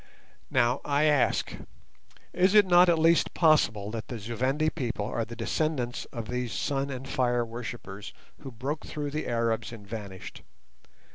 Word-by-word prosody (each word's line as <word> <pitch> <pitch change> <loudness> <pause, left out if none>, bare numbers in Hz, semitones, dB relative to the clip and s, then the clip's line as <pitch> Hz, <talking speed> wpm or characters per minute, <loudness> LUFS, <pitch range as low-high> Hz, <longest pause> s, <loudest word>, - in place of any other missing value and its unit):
Now, 125 0 +2
I 145 +1 +1
ask, 150 -4 +2 0.8
is 185 +3 +3
it 210 -1 +8
not 175 0 +6
at 170 - +4
least 165 +1 +3
possible 115 - +3
that 115 -1 -5
the 120 - -5
Zu 115 +2 -6
Vendi 135 +6 +1
people 120 -8 -3
are 115 - -2
the 115 +1 -9
descendants 125 +1 -1
of 115 -2 -7
these 125 -1 -3
"sun 140 +4 -1
and 135 0 -6
fire 120 -2 +1
worshippers" 115 -3 -7 0.3
who 135 - -8
broke 135 +6 -4
through 145 -1 -4
the 155 +1 -3
Arabs 115 -1 0
and 110 -4 -10
vanished? 100 -3 -8
125 Hz, 160 wpm, -28 LUFS, 115-150 Hz, 0.8 s, it